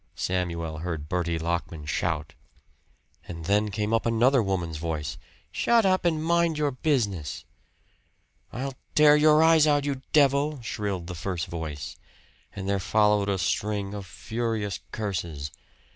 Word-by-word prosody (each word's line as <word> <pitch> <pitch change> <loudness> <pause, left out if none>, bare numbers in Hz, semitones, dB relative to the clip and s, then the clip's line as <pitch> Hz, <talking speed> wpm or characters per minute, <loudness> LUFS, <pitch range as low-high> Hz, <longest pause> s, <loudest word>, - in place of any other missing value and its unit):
Samuel 85 -4 -2
heard 80 -3 -4
Bertie 85 0 -1
Lockman 85 -2 -3
shout. 80 0 -2 0.9
And 85 -2 -7
then 105 +3 +2
came 105 +2 -2
another 115 +3 +3
woman's 90 -6 -2
voice 75 -3 -4 0.3
"Shut 235 -2 +3
up 185 -1 +2
and 160 -2 +1
mind 170 -1 +2
your 150 -1 +1
business!" 110 - -1 1.1
"I'll 135 +2 -4 0.2
tear 150 -1 +7
your 155 +1 +5
eyes 160 -1 +6
out, 145 -1 +3
you 140 -2 -2
devil!" 145 0 +3
shrilled 100 -5 -3
the 90 - -6
first 85 -1 -3
voice, 80 -4 -6 0.6
and 95 -1 -5
there 100 0 +1
followed 105 +1 +2
a 100 - +1
string 100 +1 -1
of 100 -2 -6
furious 110 +2 -3
curses. 85 -9 -4
100 Hz, 135 wpm, -26 LUFS, 85-140 Hz, 1.1 s, tear